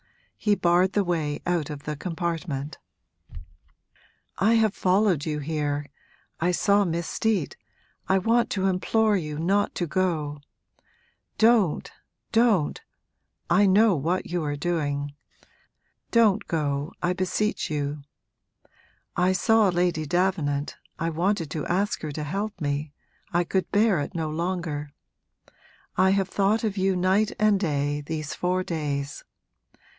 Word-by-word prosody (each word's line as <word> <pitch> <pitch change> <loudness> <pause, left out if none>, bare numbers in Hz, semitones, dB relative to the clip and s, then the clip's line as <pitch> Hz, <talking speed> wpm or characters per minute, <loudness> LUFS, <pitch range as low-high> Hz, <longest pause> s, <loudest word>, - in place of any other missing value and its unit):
He 210 -1 +1
barred 180 +1 +3
the 205 - +2
way 160 -5 -1
out 170 -4 0
of 145 -2 -7
the 150 - -4
compartment. 165 -3 -4 1.6
'I 215 +4 +4
have 220 -3 +3
followed 185 -5 +2
you 150 -1 -1
here 145 -1 -2 0.5
I 170 - +1
saw 200 +3 +3
Miss 170 -2 -2
Steet 210 -9 -1 0.5
I 190 - +4
want 230 +5 +2
to 190 -2 -1
implore 210 +3 +2
you 150 -5 -3
not 195 +6 +1
to 175 - -1
go! 155 -5 -1 1.0
Don't, 220 -7 +3 0.4
don't! 225 -9 +2 0.7
I 195 +3 +5
know 205 +1 +5
what 165 +6 -1
you're 155 -5 -1
doing. 145 -3 -2 1.0
Don't 220 -3 +3
go, 145 -2 -1
I 175 +1 +2
beseech 185 +3 -1
you. 145 -1 -2 1.1
I 180 +1 +3
saw 225 +1 +4
Lady 175 -3 0
Davenant, 155 -5 0 0.2
I 165 0 -1
wanted 170 -1 0
to 155 - -3
ask 200 +4 0
her 155 - -4
to 150 - -4
help 200 +6 -3
me, 145 -1 -2 0.4
I 175 +1 +2
could 185 +2 -1
bear 205 -3 +3
it 145 - -4
no 160 -2 -2
longer. 165 -3 -3 1.1
I 185 +1 +4
have 195 -1 +1
thought 205 +4 +1
of 210 -3 -1
you, 190 0 +2
night 190 +4 +2
and 215 -2 +3
day, 145 -4 -1
these 155 0 -4
four 180 +1 0
days. 145 -4 -3
175 Hz, 130 wpm, -25 LUFS, 150-195 Hz, 1.6 s, I